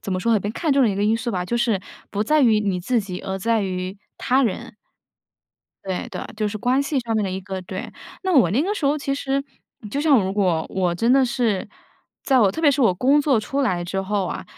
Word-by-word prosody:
怎 195 - -3
么 185 - 0
说 230 +4 +1
呢？ 220 - +4
被 205 - -3
看 300 +6 -1
中 275 - +4
的 240 - +4
一 200 - -1
个 200 - -1
因 220 +2 +3
素 235 +1 -3
吧。 180 -4 -2
就 235 +6 -2
是 230 -5 +1 0.3
不 210 0 -1
在 305 +7 +3
于 225 -5 +4
你 195 -3 -1
自 235 +6 +1
己， 185 -3 -6
而 190 0 -4
在 225 +2 +1
于 185 +1 -4 0.2
他 265 +1 +2
人。 220 -3 -3 1.1
对 190 -2 -3
对， - - -5
就 215 -1 0
是 210 +1 -4
关 250 +5 +2
系 280 0 -1
上 230 -2 -3
面 215 -2 +1
的 190 - -2
一 190 +1 -4
个 190 0 -6
对。 185 +1 -6 0.3
那 375 - 0
我 200 -10 +5
那 235 +9 +2
个 400 +6 0
时 310 - -4
候 290 +2 +2
其 275 -1 -2
实 275 0 -1 0.5
就 280 - -2
像 285 -8 +4
如 190 - -2
果 180 -6 +1
我 180 -2 0
真 230 +7 +1
的 270 -1 +5
是 235 -6 0 0.6
在 265 -2 +3
我 200 -5 +4
特 320 - -4
别 300 - +5
是 280 0 +1
我 225 - +5
工 270 +10 +3
作 275 -6 +2
出 275 +6 -2
来 185 -9 0
之 185 +3 -3
后 195 0 -1
啊， - - -5
220 Hz, 275 characters per minute, -22 LUFS, 190-270 Hz, 1.1 s, 我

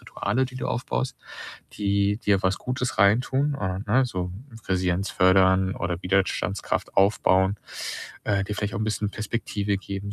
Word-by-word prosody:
Rituale, 115 +7 -1
die 130 0 -8
du - - -3
aufbaust, 130 +2 -2 0.6
die 100 0 +1
dir 100 -4 +2
was 95 +1 +2
Gutes 125 0 -3
reintun, 125 +8 +3
äh, 95 -1 -2
ne, 130 +4 +5
so 90 -5 -3 0.4
Resilienz 90 0 0
fördern 95 0 +4
oder 85 -1 -2
Widerstandskraft 100 +1 -1
aufbauen, 95 0 +3 0.7
äh, 100 -1 +1
dir 105 - -4
vielleicht 105 0 -3
auch - - -2
'n - - 0
bisschen 105 -1 -1
Perspektive 105 -2 -2
geben 100 +1 -6
100 Hz, 150 wpm, -25 LUFS, 95-110 Hz, 0.7 s, ne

